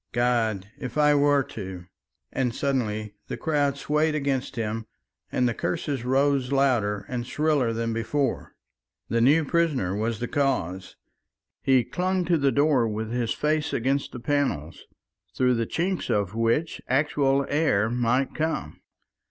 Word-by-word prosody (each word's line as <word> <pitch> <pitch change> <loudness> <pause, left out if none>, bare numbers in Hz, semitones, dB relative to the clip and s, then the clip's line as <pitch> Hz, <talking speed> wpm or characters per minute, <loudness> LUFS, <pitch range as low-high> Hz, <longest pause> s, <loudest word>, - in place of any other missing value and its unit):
God! 115 -5 +1
if 130 +1 -6
I 150 0 +5
were 145 -1 +4
to!" 95 -10 -8 0.5
and 125 -3 -1
suddenly 110 -7 -1
the - - -4
crowd 145 -4 0
swayed 150 +2 +1
against 140 -3 -1
him, 110 -1 -3 0.4
and 125 - +2
the 120 - 0
curses 125 +6 -2
rose 135 0 +2
louder 115 -7 +1
and 125 -2 -3
shriller 150 -6 +1
than 115 0 -2
before. 125 +3 -2 0.5
The 115 0 +1
new 150 +6 +4
prisoner 140 - +1
was 110 +2 -1
the 120 - -2
cause. 105 - -1 0.7
He 130 -2 +4
clung 185 +3 -1
to 170 -2 +2
the 140 -1 +3
door 140 -5 +3
with 110 +1 -3
his 120 -1 0
face 150 0 0
against 135 +4 0
the 125 - -7
panels, 120 - -1 0.5
through 125 -1 +3
the 115 -2 -1
chinks 180 +2 -2
of 100 -3 0
which 115 +8 0
actual 140 0 +2
air 145 -9 +2
might 120 +3 0
come. 160 0 -3
130 Hz, 145 wpm, -25 LUFS, 115-145 Hz, 0.7 s, I